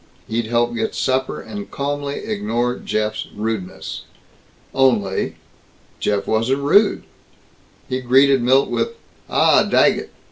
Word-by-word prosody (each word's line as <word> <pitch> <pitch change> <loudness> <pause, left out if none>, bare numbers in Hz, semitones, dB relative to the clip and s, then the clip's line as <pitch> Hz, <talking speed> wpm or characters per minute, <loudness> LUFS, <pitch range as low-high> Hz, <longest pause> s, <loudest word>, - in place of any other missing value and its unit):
He'd 115 0 -2
help 120 +1 +1
get 110 -1 -2
supper, 130 0 0
and 205 -1 -8
calmly 145 0 -3
ignore 200 - -1
Jeff's 110 0 -2
rudeness. 105 -3 -4 0.7
Only 115 -8 +1 0.6
Jeff 100 -1 0
wasn't 125 +6 0
rude. 200 +9 +4 0.8
He 130 0 -2
greeted 135 +1 +4
Milt 130 +3 +3
with, 465 - -1 0.3
"Ah, - - +4
Daggett! - - +2
130 Hz, 110 wpm, -20 LUFS, 110-140 Hz, 0.8 s, rude